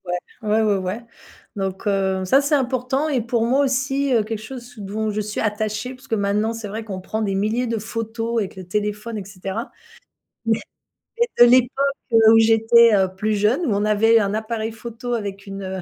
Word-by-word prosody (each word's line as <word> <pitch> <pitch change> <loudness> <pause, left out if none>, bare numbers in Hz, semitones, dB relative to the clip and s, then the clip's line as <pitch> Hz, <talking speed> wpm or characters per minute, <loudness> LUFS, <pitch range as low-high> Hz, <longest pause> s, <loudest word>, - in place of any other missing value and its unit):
Ouais. 175 - -3 0.3
Ouais, 215 0 +1
ouais, 210 -2 +2
ouais 190 +4 -3 0.6
donc 195 +1 -3
heu, 190 -2 0
ça 265 +9 +4
c'est 285 +1 +2
important 265 +2 0
et 265 -5 +1
pour 230 0 0
moi 265 +4 +3
aussi, 270 +1 0
heu, 225 -3 +3
quelque 220 0 -4
chose 245 +1 -9
dont 215 +2 -3
je 210 - -3
suis 210 0 -3
attachée, 215 +3 -2
parce 260 +1 -16
que 225 - 0
maintenant 210 +2 0
c'est 225 -2 -6
vrai 220 +2 -5
qu'on 190 -3 -6
prend 220 +4 -4
des 200 -3 -1
milliers 220 +5 0
de 230 -1 -1
photos 225 +1 -3
avec 200 -3 -4
le 190 - -8
téléphone 210 +4 -3
et 200 - -6
cetera, 195 +5 -6 0.8
mais 225 -1 +2 0.6
mais 475 - +3 0.2
de - - +5
l'époque, 270 +3 +3 0.2
heu, 225 -1 +7
où - - +7
j'étais, 225 +1 +5
heu, 190 -1 +3
plus 215 +2 0
jeune, 210 - +2
où 240 - 0
on 205 +1 0
avait 225 +2 +4
un 200 -1 0
appareil 220 +1 -3
photo 235 +2 -6
avec 200 -3 -4
une, 195 0 -7
heu, 190 0 -5
220 Hz, 210 wpm, -21 LUFS, 205-235 Hz, 0.8 s, heu